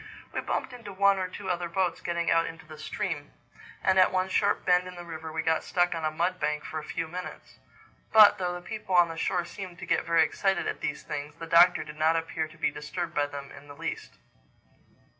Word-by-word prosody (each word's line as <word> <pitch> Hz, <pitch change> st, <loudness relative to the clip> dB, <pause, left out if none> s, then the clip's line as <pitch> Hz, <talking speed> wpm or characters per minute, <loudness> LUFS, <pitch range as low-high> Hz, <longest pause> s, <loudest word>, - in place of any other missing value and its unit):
We -, -, -1 dB
bumped 260 Hz, -, -3 dB
into 230 Hz, -5 st, -9 dB
one 200 Hz, 0 st, +3 dB
or 185 Hz, -, -1 dB
two 190 Hz, +1 st, -5 dB
other 175 Hz, -1 st, -2 dB
boats 180 Hz, -3 st, 0 dB
getting 170 Hz, -1 st, -1 dB
out 165 Hz, 0 st, +3 dB
into 165 Hz, 0 st, -9 dB
the 155 Hz, -1 st, -12 dB
stream; 155 Hz, -1 st, -4 dB, 0.5 s
and 190 Hz, 0 st, +4 dB
at 185 Hz, -, +6 dB
one 185 Hz, 0 st, 0 dB
sharp 200 Hz, +1 st, +1 dB
bend 180 Hz, 0 st, +3 dB
in 180 Hz, -, -9 dB
the 175 Hz, -, -8 dB
river 160 Hz, -1 st, -7 dB
we 160 Hz, 0 st, -2 dB
got 160 Hz, 0 st, +1 dB
stuck 175 Hz, -1 st, +1 dB
on 165 Hz, -1 st, -4 dB
a 155 Hz, -, +2 dB
mud 175 Hz, +4 st, -1 dB
bank 150 Hz, 0 st, -1 dB
for 155 Hz, -, -4 dB
a -, -, -9 dB
few 165 Hz, +1 st, -3 dB
minutes. 180 Hz, +3 st, -8 dB, 0.5 s
But 215 Hz, -3 st, +8 dB
though 180 Hz, -1 st, -1 dB
the 175 Hz, -, -7 dB
people 200 Hz, -1 st, -3 dB
on 175 Hz, -1 st, +6 dB
the 165 Hz, -, -6 dB
shore 175 Hz, +1 st, 0 dB
seemed 185 Hz, -2 st, -8 dB
to -, -, -7 dB
get -, -, +1 dB
very 165 Hz, -1 st, +5 dB
excited 195 Hz, +3 st, 0 dB
at -, -, -3 dB
these -, -, -3 dB
things, 145 Hz, 0 st, -5 dB
the 165 Hz, -, -7 dB
Doctor 170 Hz, +2 st, +6 dB
did 150 Hz, -, -10 dB
not 160 Hz, +1 st, +4 dB
appear 165 Hz, -1 st, -2 dB
to 160 Hz, +1 st, -17 dB
be 155 Hz, -, +1 dB
disturbed 170 Hz, +4 st, -5 dB
by 145 Hz, 0 st, +1 dB
them 140 Hz, -1 st, -8 dB
in 145 Hz, +1 st, -13 dB
the 145 Hz, -, -11 dB
least. -, -, -5 dB
170 Hz, 235 wpm, -28 LUFS, 160-185 Hz, 0.5 s, But